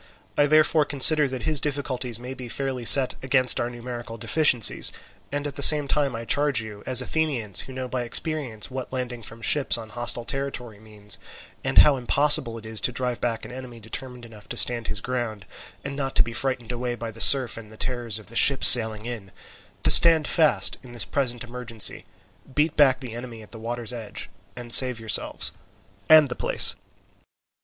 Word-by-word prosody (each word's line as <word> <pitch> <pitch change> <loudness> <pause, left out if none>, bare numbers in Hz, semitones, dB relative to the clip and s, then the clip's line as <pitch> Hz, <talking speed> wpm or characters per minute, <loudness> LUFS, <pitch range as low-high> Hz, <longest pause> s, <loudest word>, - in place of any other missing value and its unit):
I 145 - +1
therefore 155 +1 +2
consider 145 +1 +2
that 130 -2 -7
his 155 -3 +1
difficulties 135 -5 -5
may 125 +2 -9
be 125 -2 -11
fairly 130 -2 -6
set 130 +2 +8
against 130 -1 +1
our 120 - -3
numerical 120 -1 -9
deficiencies, 125 -2 +1 0.4
and 145 +1 -5
at 145 -2 -7
the - - -6
same 150 0 +5
time 140 -3 -1
I 115 0 -8
charge 145 +1 0
you, 105 -2 -9
as 130 -1 +6
Athenians 125 -8 -3
who 130 - -9
know 130 0 -7
by 125 0 -5
experience 125 -2 -2
what 130 -1 -8
landing 125 -2 -6
from 115 +1 -13
ships 135 +4 +1
on 110 -2 -11
a - - -18
hostile 120 0 -2
territory 130 -6 -6
means, 105 -2 -8 0.4
and - - -4
how 145 -2 +5
impossible 125 -2 0
it 110 - -13
is 110 -1 -3
to - - -1
drive 125 -1 -5
back 115 -2 -4
an - - -11
enemy 125 -2 -11
determined 125 +2 -7
enough 110 -2 -16
to 120 - -6
stand 120 -2 +1
his 105 - -4
ground 120 -5 -6 0.4
and 140 0 -7
not 135 -1 -5
to - - +3
be 115 - -8
frightened 125 -2 -4
away 120 0 -5
by 115 -1 -8
the 115 +1 -8
surf 130 -4 +6
and 110 -2 -12
the 110 - -16
terrors 120 -4 -4
of 110 - -12
the 115 - -13
ships 140 +3 +6
sailing 110 -3 +7
in, 110 -6 -9 0.5
to - - +2
stand 165 -3 +7
fast 160 -3 0
in 125 -2 -15
the 115 -4 -3
present 125 -4 -3
emergency, 120 -2 -5 0.5
beat 150 +1 -1
back 135 -2 +2
the 125 -4 -9
enemy 120 -2 -10
at 105 - -19
the 115 - -11
water's 120 +1 -5
edge, 115 -4 -9 0.2
and 120 -1 -1
save 125 -3 +6
yourselves 110 -1 0 0.6
and 155 -2 +6
the 125 - -7
place." - - +3
125 Hz, 200 wpm, -22 LUFS, 115-135 Hz, 0.6 s, set